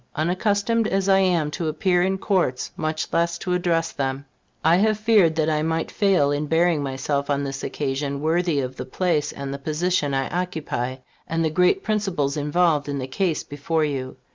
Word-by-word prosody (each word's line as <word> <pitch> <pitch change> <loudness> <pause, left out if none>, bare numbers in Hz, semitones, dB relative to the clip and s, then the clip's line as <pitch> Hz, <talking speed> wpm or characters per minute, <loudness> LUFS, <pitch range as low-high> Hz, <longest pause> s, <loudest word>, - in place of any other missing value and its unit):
Unaccustomed 205 +7 +1
as 195 -1 0
I 195 -1 +5
am 175 -6 +2
to 165 +1 -3
appear 175 +3 +1
in 190 +1 +1
Courts, 185 -10 0
much 155 0 -3
less 170 0 +1
to 180 +1 -2
address 170 -2 +1
them, 135 0 -3 0.4
I 165 +2 +6
have 215 +2 +2
feared 210 -7 +4
that 155 -1 +1
I 155 -1 +1
might 160 +1 -1
fail 190 -9 +2
in 145 +1 -1
bearing 165 0 +2
myself 140 +1 -2
on 140 0 +1
this 135 -1 -5
occasion 140 0 -2
worthy 160 0 +1
of 130 0 -5
the - - -5
place 170 -5 0
and 140 0 -6
the 140 - -6
position 150 -1 0
I 135 0 0
occupy, 160 -8 -3 0.3
and 165 0 0
the 160 - 0
great 180 - +3
principles 190 -10 -1
involved 150 0 +1
in 140 - -2
the 130 - -3
case 160 +4 -1
before 155 +2 -1
you. 135 -3 -4
160 Hz, 190 wpm, -23 LUFS, 145-180 Hz, 0.4 s, I